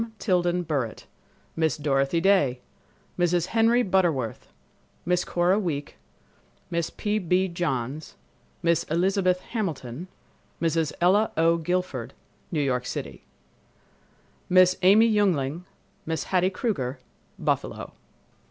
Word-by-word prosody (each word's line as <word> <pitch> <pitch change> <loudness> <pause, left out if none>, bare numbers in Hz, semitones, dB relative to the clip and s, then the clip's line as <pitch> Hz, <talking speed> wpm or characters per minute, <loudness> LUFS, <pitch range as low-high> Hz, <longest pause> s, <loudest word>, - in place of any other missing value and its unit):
Tilden 180 -3 +1
Burritt, 140 -8 -3 0.5
Miss 160 -3 +1
Dorothy 140 +1 +1
Day, 170 -10 +3 0.6
Mrs. 175 -1 +2
Henry 230 +2 +4
Butterworth, 170 - 0 0.6
Miss 180 +1 +1
Cora 180 +3 +1
Week, 150 -8 -3 0.8
Mrs. 170 -1 -2
P. 210 0 0
B. 185 0 +1
Johns, 155 -5 -3 0.5
Miss 170 -1 +3
Elizabeth 180 +2 +1
Hamilton, 165 - -4 0.5
Mrs. 165 -2 0
Ella 200 +5 +4
O. 165 +1 +4
Guilford, 165 -8 -3 0.4
New 155 -4 0
York 125 -2 -1
City; - - -6 1.2
Miss 185 0 +6
Amy 205 +5 +6
Juengling, 180 -7 +1 0.4
Miss 160 -1 -1
Hattie 185 0 +1
Kruger, 180 - -2 0.4
Buffalo. - - -2
175 Hz, 105 wpm, -25 LUFS, 150-185 Hz, 1.2 s, Miss